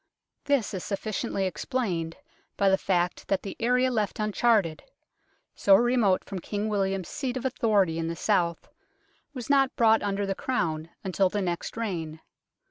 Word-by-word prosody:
This 280 -8 +1
is 190 - -3
suffi 210 +2 -4
ciently 195 -1 -1
explained 180 - -2 0.4
by 200 -1 +4
the 190 - +4
fact 180 -1 0
that 195 -1 0
the 195 - -6
area 250 +2 +2
left 215 -4 -1
uncharted, 215 -5 +2 0.7
so 195 - +5
remote 235 -4 +3
from 195 - -6
King 205 +4 -3
William's 195 -3 -1
seat 260 -3 -3
of 255 - -5
authority 205 -9 +2
in 165 - -2
the 165 - -3
south, 170 -4 0 0.7
was 245 -3 -6
not 275 -2 +3
brought 225 -1 +4
under 200 0 -1
the 195 - -1
Crown 165 -9 -2
until 190 0 +1
the 205 - -2
next 175 +2 -3
reign. 165 -8 -3
200 Hz, 160 wpm, -27 LUFS, 180-230 Hz, 0.7 s, so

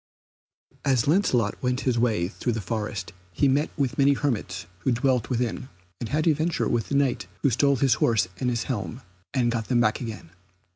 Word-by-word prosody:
As 130 -4 +2
Lancelot 130 - +2
went 125 0 0
his 125 -3 +1
way 110 -8 +1
through 120 +4 -3
the 110 - -2
forest 105 -1 -4 0.2
he 140 - +3
met 140 +3 +2
with 135 -4 -1
many 140 +1 +5
hermits 105 -10 -2
who 130 - 0
dwelled 125 -1 +1
therein, 125 +1 -2 0.3
and 115 - -4
had 155 +2 0
adventure 160 +1 +1
with 120 -2 -1
the 140 - 0
Knight 140 -2 +1 0.2
who 140 - +4
stole 140 +4 +3
his 130 -1 +3
horse 110 -5 +3
and 125 - 0
his 120 -1 -1
helm, 115 0 -4 0.3
and 120 -3 +1
got 115 -2 -2
them 125 -2 +2
back 110 0 +2
again. 110 -8 -7
125 Hz, 190 wpm, -25 LUFS, 115-140 Hz, 0.3 s, many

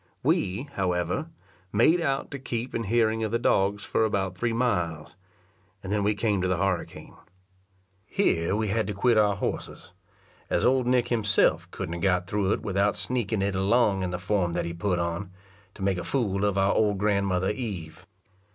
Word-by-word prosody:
We, 95 +7 +1
however, 90 - -1 0.4
made 155 +12 +4
out 135 -4 -1
to 140 - -5
keep 120 -1 -4
in 115 - -2
hearing 110 +1 +1
of 110 - -1
the 115 - +2
dogs 100 -3 +1
for - - +1
about 95 -4 -1
three 120 +4 -1
miles, 90 -11 -1 0.7
and 100 +1 -3
then 105 -1 +1
we 105 +1 +2
come 105 -3 0
to 95 - 0
the 90 -1 +1
harricane. 95 -2 -2 0.9
Here 95 - +1
we 110 -1 -1
had 110 0 0
to 105 - -3
quit 120 +3 +3
our 105 -1 +3
horses, 90 -2 -5 0.6
as - - +1
old 130 -1 +3
Nick 125 -1 +2
himself 105 -4 +2
couldn't 85 - -5
have 85 - -5
got 90 -1 +2
through 100 +1 0
it - - 0
without 100 0 +1
sneaking 110 -1 -1
it 100 0 0
along 100 +1 +2
in 90 - -1
the 90 - -3
form 95 -2 0
that 85 0 -1
he 85 - -4
put 90 +2 -1
on, 85 +2 -2 0.5
to 95 - -7
make 95 -2 +1
a - - -4
fool 105 -7 0
of 100 -1 0
our 95 0 +3
old 105 -2 +2
grandmother 100 -2 +1
Eve. 100 -10 -6
100 Hz, 190 wpm, -26 LUFS, 95-115 Hz, 0.9 s, made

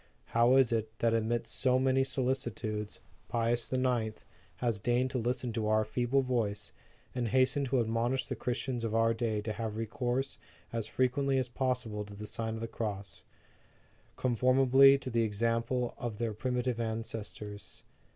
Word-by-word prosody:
How 120 +2 +5
is 135 -3 +5
it, 110 -1 0
that 115 -1 +2
amidst 115 +1 0
so 130 -1 +2
many 130 0 +3
solicitudes, 120 -5 -2 0.3
Pius 115 0 0
IX. 125 -4 0 0.4
has 115 -4 -1
deigned 125 +4 +1
to 130 - -1
listen 120 0 -1
to 110 -2 -1
our 110 0 +3
feeble 125 +5 +1
voice, 110 -5 -1 0.4
and 125 -2 -1
hastened 130 +3 +2
to 130 0 +2
admonish 115 +3 0
the - - -4
Christians 125 0 -2
of 115 -1 -1
our 115 0 +4
day 110 -2 -1
to 110 +1 -3
have 110 0 -4
recourse 120 +4 -2 0.3
as 115 -2 -2
frequently 135 +1 +1
as 130 -2 0
possible 125 -5 -1
to 100 0 -11
the 105 +1 -7
Sign 110 +1 -3
of 110 - -6
the 115 - -2
Cross, 105 -3 -5 0.9
conformably 130 +2 +5
to 135 -2 -6
the 115 0 +2
example 115 +3 0
of 115 -3 -4
their 115 -1 -1
primitive 125 +1 -1
ancestors? 110 -3 -5
120 Hz, 160 wpm, -31 LUFS, 110-130 Hz, 0.9 s, How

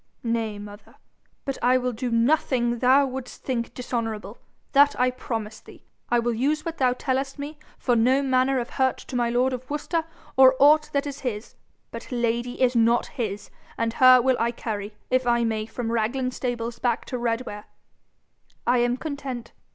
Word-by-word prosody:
'Nay, 230 -3 -1
mother; 205 0 -11 0.5
but 275 -1 -3
I 250 +1 +4
will 250 0 -1
do 245 +2 -3
nothing 240 -1 +1
THOU 260 +3 +5
wouldst 265 -1 -7
think 235 -3 -2
dishonourable 225 -4 -4 0.3
that 285 +1 +4
I 250 0 +3
promise 225 -4 -5
thee. - - -16 0.3
I 240 - +3
will 235 0 +1
use 290 +7 0
what 330 -1 -5
thou 255 -2 +3
tellest 270 +2 -2
me 290 +1 -7 0.2
for 245 - +1
no 255 +4 +3
manner 260 0 +2
of 240 - -5
hurt 260 -1 +1
to 260 - -9
my 240 -1 +1
lord 250 +2 +1
of 255 0 -6
Worcester 310 +3 -1 0.3
or 265 0 +7
aught 300 +2 +5
that 280 0 +1
is 285 -1 -6
his. 225 -4 -5 0.4
But 230 +3 -9
Lady 240 0 -1
is 255 -1 +3
not 235 +1 +3
his, 210 -7 -5 0.3
and 230 0 -1
her 255 0 +7
will 255 +1 +2
I 230 - +2
carry, 210 -3 -5 0.2
if 255 -1 +2
I 235 0 +3
may, 220 -1 -1
from 230 -1 -4
Raglan 240 +3 0
stables 240 -2 -4
back 240 -1 0
to 250 - -4
Redware.' 230 -3 -3 1.0
'I 245 +1 +3
am 240 +1 +1
content. 270 -5 -6
245 Hz, 180 wpm, -25 LUFS, 230-265 Hz, 1.0 s, or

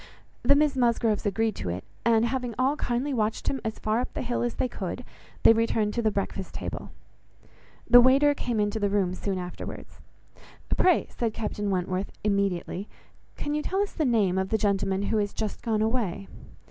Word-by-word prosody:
The 280 +4 +5
Miss 295 -1 +3
Musgroves 235 -4 +1
agreed 220 +2 0
to 90 - -4
it; 90 +2 -4 0.2
and 230 -1 +4
having 245 -2 -2
all 265 +3 +2
kindly 260 +1 -1
watched 220 -3 -1
him 270 - -2
as 220 -1 -3
far 215 +2 0
up 250 - -3
the - - -2
hill 240 0 -1
as 240 0 -1
they - - 0
could, 235 +2 -5 0.4
they - - +8
returned 225 -2 +1
to 235 - 0
the 220 - +2
breakfast 195 -2 -4
table. - - -5 1.0
The 245 0 +9
waiter 275 +4 +5
came 240 -5 -2
into 205 +1 0
the 205 -1 +1
room 195 -3 +1
soon 190 +1 -3
afterwards. 180 -1 -7 0.7
"Pray," 360 -2 +3
said 230 -2 -2
Captain 210 -2 -3
Wentworth, 185 +1 -1
immediately, 200 -1 -1 0.5
"can 290 - -3
you 300 - 0
tell 380 +5 -1
us 405 - -5
the 320 - -1
name 205 -7 +2
of 190 0 -1
the 220 - +2
gentleman 195 -1 0
who 220 +1 +1
is 205 -1 -1
just 215 -2 -3
gone 220 -2 0
away?" 220 -5 -1
220 Hz, 190 wpm, -27 LUFS, 200-245 Hz, 1.0 s, The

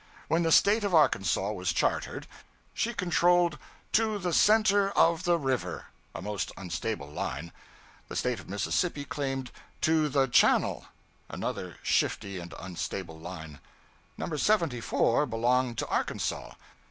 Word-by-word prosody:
When 165 +3 +2
the 165 -1 +1
State 210 +5 +5
of 200 -4 +1
Arkansas 95 - +3
was 90 -4 -1
chartered, 80 - -1 0.5
she 235 - -1
controlled 175 -5 +2 0.3
'to 220 -1 +2
the 180 -3 -2
center 205 -1 +4
of 170 +2 +3
the 175 -1 +3
river' 135 -5 -2 0.3
a - - -6
most 105 -1 -3
unstable 90 -2 -4
line. 75 +2 -5 0.6
The - - -8
State - - -1
of - - -13
Mississippi 145 - -1
claimed 135 -3 -3 0.3
'to 155 -1 +3
the 135 -1 +3
channel' 120 - +3 0.4
another - - -5
shifty 100 -2 0
and 85 0 -9
unstable 90 -2 -5
line. 80 -3 -8 0.6
No. 160 - -3
74 150 - +1
belonged 120 +1 +1
to - - -2
Arkansas. - - -2
135 Hz, 130 wpm, -29 LUFS, -, 0.6 s, State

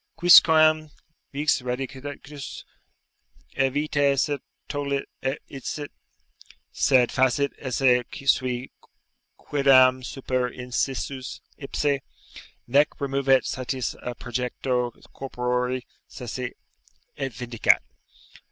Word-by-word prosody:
"Quisquam 155 -3 +6 0.4
Vix 145 0 +1
radicitus 135 +3 -6 0.9
e 135 0 +2
vita 145 0 +1
se 145 +1 +1 0.3
tollit, 140 -1 -2 0.2
et 135 +2 -1
eicit; 145 +2 -6 0.8
Sed 125 -3 +3
facit 130 +2 +2
esse 125 -1 +2 0.2
sui 130 -1 +1 0.7
quiddam 130 -2 +4
super 130 -1 -2
inscius 130 +1 -3 0.2
ipse, 140 0 -1 0.7
Nec 140 +5 +2
removet 135 -1 +2
satis 130 -1 -3
a 125 - -5
projecto 125 0 -2 0.2
corpore 125 -1 -2 0.2
sese, 125 +1 -6 0.6
et 135 -1 -3
Vindicat." 120 -2 +2
135 Hz, 85 wpm, -25 LUFS, 125-140 Hz, 0.9 s, Quisquam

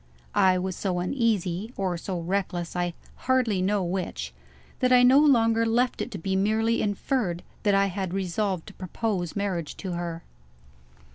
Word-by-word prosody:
I 185 -1 +4
was 185 0 -2
so 185 -3 -2
uneasy, 205 0 -1
or 185 -2 -1
so 175 +1 -4
reckless 175 -1 -2
I 175 -1 -1 0.3
hardly 245 -7 +2
know 200 +1 +1
which 180 0 -3 0.5
that 255 -1 +2
I 250 0 +7
no 260 +3 +7
longer 230 -6 +4
left 240 +2 +1
it - - -3
to 215 - -6
be 190 +2 -2
merely 220 +4 +2
inferred 205 -3 -1 0.2
that 205 -2 +3
I 195 0 +4
had 190 -1 -3
resolved 190 -1 -1
to - - -11
propose 185 -1 -3
marriage 190 -6 -2
to 190 - -5
her. 170 -1 -4
195 Hz, 160 wpm, -26 LUFS, 180-225 Hz, 0.5 s, I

